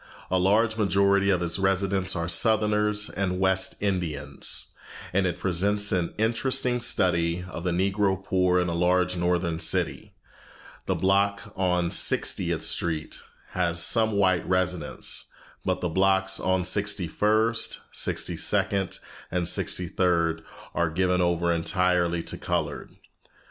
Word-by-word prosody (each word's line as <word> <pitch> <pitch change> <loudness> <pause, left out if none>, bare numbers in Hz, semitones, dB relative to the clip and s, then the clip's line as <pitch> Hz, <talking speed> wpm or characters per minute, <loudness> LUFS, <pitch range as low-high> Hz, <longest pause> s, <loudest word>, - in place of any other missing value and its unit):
A 95 - +2
large 110 +4 +2
majority 100 -1 +2
of 90 -3 +1
its 85 +2 -1
residents 95 0 0
are 85 -1 -2
Southerners 105 +2 +2
and 90 -1 -3
West 95 0 +1
Indians, 80 -8 -2 0.4
and 95 0 +2
it 90 - -3
presents 100 +3 +1
an 90 -4 -1
interesting 120 +2 0
study 90 -5 +1
of 85 -2 -8
the 90 - -1
Negro 95 +2 0
poor 90 -1 +2
in 90 - 0
a 85 - -2
large 90 +1 +1
northern 85 -1 -1
city. - - -1 0.7
The - - 0
block 100 +1 0
on 90 -2 0
Sixtieth - - +2
Street 80 -2 0 0.3
has 85 -2 -1
some 110 +5 +3
white 95 -3 +2
residents, 90 -4 -1 0.4
but 95 0 -2
the 90 - -1
blocks 95 +2 +2
on 95 -1 0
Sixty 100 -1 +1
first, 110 +6 +1
Sixty - - -1
second, 95 -2 0 0.3
and 90 -1 -1
Sixty 90 +1 +1
third 85 -2 0 0.3
are 85 -1 0
given 90 +2 0
over 85 -1 +1
entirely 85 0 0
to - - -3
colored. - - -3
95 Hz, 135 wpm, -25 LUFS, 85-100 Hz, 0.7 s, some